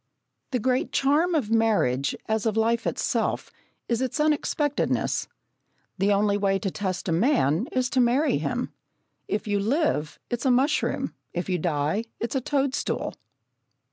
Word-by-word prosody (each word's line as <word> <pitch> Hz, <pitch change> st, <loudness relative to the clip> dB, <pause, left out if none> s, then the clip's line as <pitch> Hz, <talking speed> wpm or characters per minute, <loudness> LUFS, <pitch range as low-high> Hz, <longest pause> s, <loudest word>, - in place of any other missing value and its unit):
The 255 Hz, -, 0 dB
great 255 Hz, +2 st, 0 dB
charm 310 Hz, +6 st, +2 dB
of 240 Hz, -8 st, 0 dB
marriage, 205 Hz, -, +2 dB
as 220 Hz, 0 st, 0 dB
of 220 Hz, 0 st, 0 dB
life 230 Hz, +1 st, +2 dB
itself, -, -, -1 dB, 0.4 s
is 235 Hz, 0 st, 0 dB
its 260 Hz, +3 st, -2 dB
unexpectedness. 300 Hz, -1 st, +1 dB, 0.7 s
The 200 Hz, +2 st, +3 dB
only 205 Hz, 0 st, +3 dB
way 195 Hz, -1 st, +2 dB
to 195 Hz, -1 st, -3 dB
test 185 Hz, -2 st, -3 dB
a -, -, 0 dB
man 185 Hz, -, +2 dB
is 255 Hz, -1 st, +1 dB
to 260 Hz, -, +2 dB
marry 250 Hz, +6 st, +3 dB
him. -, -, -2 dB, 0.5 s
If 210 Hz, +2 st, -2 dB
you 205 Hz, -1 st, +1 dB
live, 225 Hz, -, 0 dB
it's 240 Hz, +2 st, -1 dB
a -, -, +4 dB
mushroom; 275 Hz, +5 st, +1 dB, 0.2 s
if 175 Hz, +2 st, -3 dB
you 180 Hz, -1 st, +1 dB
die, 155 Hz, +6 st, 0 dB
it's 235 Hz, -, -3 dB
a 265 Hz, -, 0 dB
toadstool! 275 Hz, 0 st, -1 dB
225 Hz, 150 wpm, -26 LUFS, 195-270 Hz, 0.7 s, a